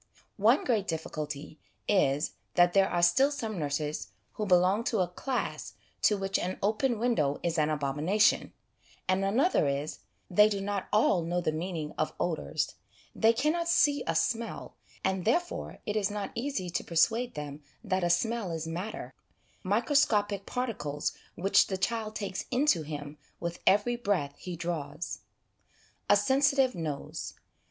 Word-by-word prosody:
One 225 +7 +4
great 215 -6 +1
difficulty 155 -2 -5 0.3
is, 150 -6 +2 0.2
that 175 0 +5
there 195 -1 +4
are 175 0 0
still 220 +12 +5
some 225 -9 -4
nurses 150 0 -2 0.3
who 210 - -3
belong 185 +4 +4
to 220 -6 +1
a 180 - +1
class 250 +9 -3 0.3
to 210 - +4
which 195 0 -1
an 185 +1 -3
open 225 +4 +1
window 210 - +1
is 170 -1 0
an 150 0 +2
abomination; 150 +8 +2 0.6
and 185 +1 +2
another 225 - +2
is, 140 +2 -2 0.3
they 210 +4 +5
do 200 -2 -1
not 200 0 -3
all 210 -4 +4
know 175 +2 -1
the 165 - 0
meaning 160 -1 -4
of 155 - 0
odours: 170 -3 -1 0.4
they 225 0 +4
cannot 310 +8 0
see 290 -3 +4
' - - -24
a 165 - 0
smell,' 230 +7 -1 0.3
and, 190 -1 0
therefore, 345 - -1
it 210 - -2
is 210 -2 +1
not 205 -1 -4
easy 230 -9 -3
to - - -1
persuade 225 +9 +1
them 150 0 -6 0.2
that 190 -4 0
a 175 - +2
smell 220 +4 +1
is 165 -1 -3
matter, 175 +6 -5 0.5
microscopic 205 -2 +2
particles 205 - -2 0.2
which 195 +3 +4
the 190 - -2
child 220 +1 -2
takes 200 -3 -4
into 250 - +3
him 145 -1 -7 0.2
with 170 0 -4
every 210 +5 +4
breath 195 -11 0
he 180 -1 -6
draws. 165 -2 -4 0.9
A 205 - +7
Sensitive 270 +3 +3
Nose. 155 -5 -5
190 Hz, 155 wpm, -29 LUFS, 165-225 Hz, 0.9 s, A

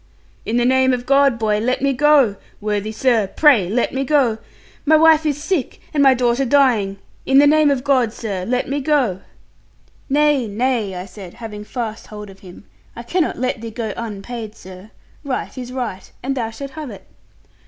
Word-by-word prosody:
'In 230 - 0
the 240 - +2
name 260 0 +3
of 245 -1 -3
God, 275 -2 +3
boy, 215 -2 0
let 250 +4 0
me 275 0 +2
go. 280 -6 +4 0.2
Worthy 210 0 -2
sir, 225 -2 +1
pray 230 - +4
let 235 +4 0
me 270 +1 -1
go. 260 -6 +2 0.4
My 315 +1 +4
wife 315 0 +5
is 290 -1 -1
sick, 340 -9 -2
and 295 - +2
my 270 -2 +6
daughter 245 +1 +1
dying 235 -8 +2 0.3
in 270 - +3
the 285 - +7
name 305 0 +4
of 270 -3 0
God, 260 -5 +2
sir, 200 -5 -5
let 250 +5 -1
me 280 +2 -2
go.' 260 - +1 0.9
'Nay, 290 -3 +2
nay,' 220 -2 -1
I 180 +1 -6
said, 190 -1 -11
having 220 -3 -8
fast 225 -1 -5
hold 210 -1 -9
of 195 - -17
him, 180 0 -13 0.3
'I 235 - -8
cannot 340 +7 -1
let 255 -1 -2
thee 230 - -6
go 220 -2 -4
unpaid, 220 0 -6
sir. 185 +2 -13 0.3
Right 275 -3 -4
is 250 -1 -7
right; 245 -7 -5
and 270 +1 -2
thou 230 -4 -2
shalt 275 +5 -8
have 305 -1 -7
it.' - - -11
245 Hz, 190 wpm, -19 LUFS, 215-275 Hz, 0.9 s, the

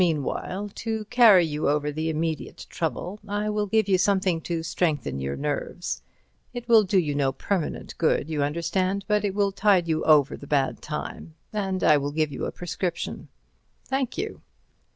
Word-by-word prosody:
"Meanwhile, 180 +5 -1
to 220 -1 -3
carry 220 -8 +7
you 150 -2 -1
over 150 0 +1
the 155 +2 -2
immediate 160 -1 -3
trouble 195 +4 -3
I 205 +1 -1
will 210 0 -1
give 220 +1 +2
you 190 -2 +3
something 190 -3 +2
to 165 0 -3
strengthen 150 - -1
your 70 +1 -3
nerves. - - -3 0.5
It 240 -1 -6
will 230 -2 +7
do 195 -1 +1
you 155 -5 +2
no 140 -2 +1
permanent 170 +5 -3
good, 160 -3 +2
you 155 -2 -2
understand, 185 +6 0
but 210 -1 +2
it 200 -2 -1
will 200 -1 +2
tide 195 -3 +3
you 160 -1 0
over 150 -3 +5
the 140 - -11
bad 140 -2 0
time. 155 +1 -6 0.2
And 190 -3 -1
I 150 - +6
will 145 0 -2
give 155 -1 0
you 140 - -4
a - - -3
prescription." 175 0 -4 0.6
"Thank 265 -2 -2
you." 425 +3 -4
175 Hz, 175 wpm, -25 LUFS, 150-205 Hz, 0.6 s, carry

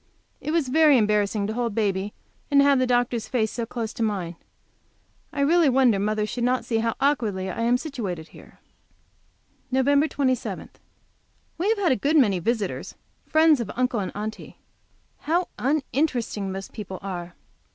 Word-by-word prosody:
It - - -6
was 315 -4 +1
very 305 0 +5
embarrassing 210 -1 +1
to 215 - -3
hold 235 -2 -2
baby 200 -2 0 0.4
and 280 - +4
have 280 -1 +4
the 255 - +2
doctor's 245 -2 +1
face 220 -4 0
so 235 -2 -4
close 230 -2 -4
to - - -7
mine. 190 -6 -1 1.0
I 285 - -2
really 320 +1 +4
wonder 250 -5 +4
mother 210 +1 0
should 240 +3 -4
not 250 +1 +1
see 225 -2 0
how 230 0 0
awkwardly 215 -10 0
I 230 - -4
am 240 +2 +3
situated 210 - -5
here. - - -16 1.1
Nov. 260 0 +1 0.2
27. 260 -3 -2 0.9
We 375 +5 +1
have 405 -6 +2
a - - +4
good 290 +9 +1
many 205 -10 +4
visitors, 210 +1 -2 0.3
friends 315 -2 +5
of 230 -4 -3
Uncle 250 -2 0
and 190 - -3
Aunty. 215 +1 -6 0.6
How 345 +4 0
uninteresting 260 -6 -1
most 195 0 -7
people 195 -4 -6
are! 175 -3 -6
235 Hz, 160 wpm, -24 LUFS, 205-275 Hz, 1.1 s, very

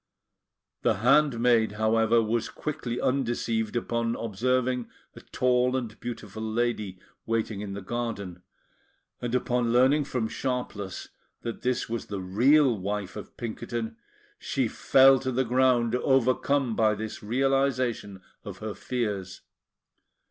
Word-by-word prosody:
The - - +2
handmaid, 120 -2 +3
however, 110 +1 +3
was 115 +1 -1
quickly 140 -6 -4
undeceived 120 -4 -1
upon 115 0 -1
observing 125 +3 -1 0.3
a - - -10
tall 125 0 +1
and 115 -4 -5
beautiful 110 -3 -6
lady 110 -3 -1 0.3
waiting 110 -2 -1
in 100 -2 -5
the 100 0 -6
garden; 100 -5 -4 0.8
and 120 0 -2
upon 125 -2 +1
learning 135 +5 +4
from 125 -5 -2
Sharpless 110 -6 -4 0.3
that 115 -1 -5
this 125 0 0
was 115 0 -4
the 100 - -4
"real" 125 +8 +4
wife 100 0 -4
of - - -9
Pinkerton, 115 - -4 0.4
she 130 -4 -1
fell 135 +4 +5
to 130 0 -2
the 130 +1 +1
ground, 125 -1 +3
overcome 130 0 +2
by 110 -1 +3
this 110 +1 -6
realisation 125 -4 0 0.2
of 100 -4 -8
her 110 +1 -5
fears. 100 -4 -3
115 Hz, 125 wpm, -27 LUFS, 110-125 Hz, 0.8 s, fell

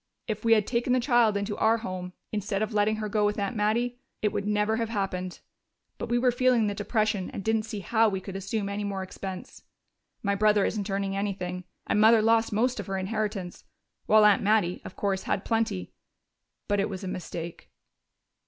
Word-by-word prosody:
If 215 -1 -3
we 230 0 +5
had 215 -2 +3
taken 240 +1 0
the 255 - +3
child 235 -4 +3
into 200 +1 -2
our 225 +1 +3
home, 185 -4 -5 0.2
instead 205 -1 -1
of 215 - -3
letting 210 +1 +2
her 215 0 -3
go 210 0 +1
with 205 0 +1
Aunt 200 +2 -2
Mattie, 235 +4 0 0.2
it 210 - +1
would 200 - -2
never 210 +1 +1
have 230 -1 -1
happened. 190 -4 -3 0.6
But - - -4
we 240 - +2
were 250 +1 +3
feeling 245 -2 +3
the 205 - 0
depression 210 -1 0
and 195 - -6
didn't 220 0 0
see 215 -3 -5
how 225 +3 +3
we 190 -2 -2
could 190 0 -8
assume 200 +2 -2
any 200 +1 -3
more 195 -2 -3
expense. 190 0 -7 0.6
My 200 -1 +1
brother 210 0 +3
isn't 210 -1 -2
earning 195 0 -1
anything, 185 -3 -3 0.2
and 210 - +2
Mother 220 0 +6
lost 225 +1 +3
most 240 +3 +1
of 205 - -5
her 195 0 -2
inheritance. 200 -2 -3 0.4
While 215 0 +6
Aunt 210 -1 +5
Mattie, 205 -4 +2
of - - -9
course, 195 -2 -1
had 195 - -1
plenty.... 225 -5 -1 0.7
But 205 -1 +1
it 200 - +1
was 190 -1 -6
a - - -4
mistake." 170 -2 -6
210 Hz, 200 wpm, -27 LUFS, 195-220 Hz, 0.7 s, Mother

